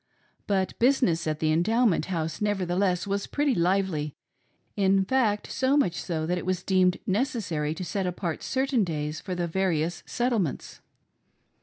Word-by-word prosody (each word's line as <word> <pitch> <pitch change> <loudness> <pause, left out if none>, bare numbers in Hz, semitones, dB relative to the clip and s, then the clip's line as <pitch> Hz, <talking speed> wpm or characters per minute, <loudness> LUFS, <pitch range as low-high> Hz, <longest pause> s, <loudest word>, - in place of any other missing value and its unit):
But 190 -2 0
business 235 -11 +2
at 155 -1 0
the 155 0 +1
Endowment 215 +5 +2
House 165 -2 -3
nevertheless 185 -2 0
was 200 0 -2
pretty 290 -2 +1
lively; 175 - 0 0.6
in 195 -1 +3
fact 220 -3 +1
so 265 +2 +2
much 185 - +2
so 165 -3 -3
that 180 +2 0
it - - -7
was 185 -1 -1
deemed 185 -1 +3
necessary 190 - -1
to 180 - -5
set 190 +1 -2
apart 175 -2 -3
certairi 265 -3 0
days 150 -3 -3
for 185 -2 -5
the 175 -1 -1
various 170 -2 0
Settlements. 235 - -1
185 Hz, 150 wpm, -27 LUFS, 170-210 Hz, 0.6 s, in